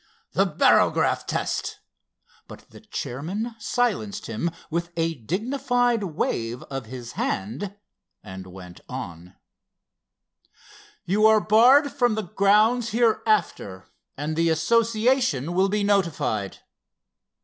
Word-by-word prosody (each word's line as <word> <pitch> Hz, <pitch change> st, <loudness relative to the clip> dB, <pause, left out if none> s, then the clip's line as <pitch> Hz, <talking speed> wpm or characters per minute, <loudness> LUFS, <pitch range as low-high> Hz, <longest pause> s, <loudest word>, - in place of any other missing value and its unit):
"The -, -, +2 dB
barograph -, -, +2 dB
test"—but -, -, -7 dB
the -, -, -13 dB
chairman 195 Hz, -, -5 dB
silenced 215 Hz, -2 st, -1 dB
him 115 Hz, +9 st, -2 dB, 0.2 s
with 170 Hz, +1 st, -2 dB
a 165 Hz, 0 st, 0 dB
dignified 240 Hz, -, 0 dB
wave 120 Hz, -8 st, -3 dB
of 135 Hz, -4 st, -5 dB
his 120 Hz, -1 st, -8 dB
hand 125 Hz, -, -3 dB, 0.5 s
and 95 Hz, -2 st, -9 dB
went 90 Hz, -1 st, -12 dB
on: 90 Hz, +2 st, -8 dB, 1.7 s
"You 205 Hz, +5 st, +4 dB
are 220 Hz, 0 st, +5 dB
barred 250 Hz, +8 st, +5 dB
from 245 Hz, -5 st, +1 dB
the 215 Hz, -, -2 dB
grounds 215 Hz, +6 st, +3 dB
hereafter 215 Hz, -, 0 dB, 0.3 s
and 150 Hz, +3 st, -3 dB
the 165 Hz, +1 st, +2 dB
Association 220 Hz, -, +1 dB
will 190 Hz, +2 st, +2 dB
be 210 Hz, +1 st, 0 dB
notified. 170 Hz, -, 0 dB
195 Hz, 105 wpm, -24 LUFS, -, 1.7 s, are